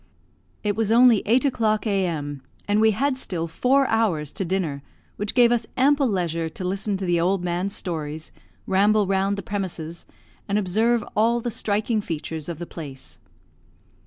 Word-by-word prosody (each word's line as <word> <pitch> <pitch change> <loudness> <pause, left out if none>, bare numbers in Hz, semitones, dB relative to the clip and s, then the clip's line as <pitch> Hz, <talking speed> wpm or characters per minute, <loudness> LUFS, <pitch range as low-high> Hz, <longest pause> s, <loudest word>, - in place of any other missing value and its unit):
It 205 -1 0
was 220 0 0
only 235 -2 +6
eight 245 +5 +3
o'clock 220 -5 +1
a.m., 165 -9 -1 0.3
and 205 +1 +2
we 220 - +6
had 260 +5 0
still 170 -9 -2
four 260 +11 +2
hours 195 - +1
to - - -3
dinner, 170 -6 -2 0.4
which 205 0 -3
gave 240 -2 +6
us 240 -1 0
ample 280 +1 +4
leisure 170 -5 -1
to 160 - -8
listen 195 +2 -1
to 190 - -4
the 175 -1 +2
old 185 +1 +1
man's 180 +3 -2
stories, 155 -3 -4 0.3
ramble 205 +2 +3
round 195 +1 0
the 200 - -5
premises, 175 -5 -5 0.4
and 205 0 +1
observe 220 +4 +1
all 230 +3 +3
the 240 0 -3
striking 215 0 0
features 160 -3 -5
of 170 - -4
the 175 - -6
place. 145 -6 -9
200 Hz, 165 wpm, -24 LUFS, 170-225 Hz, 0.4 s, only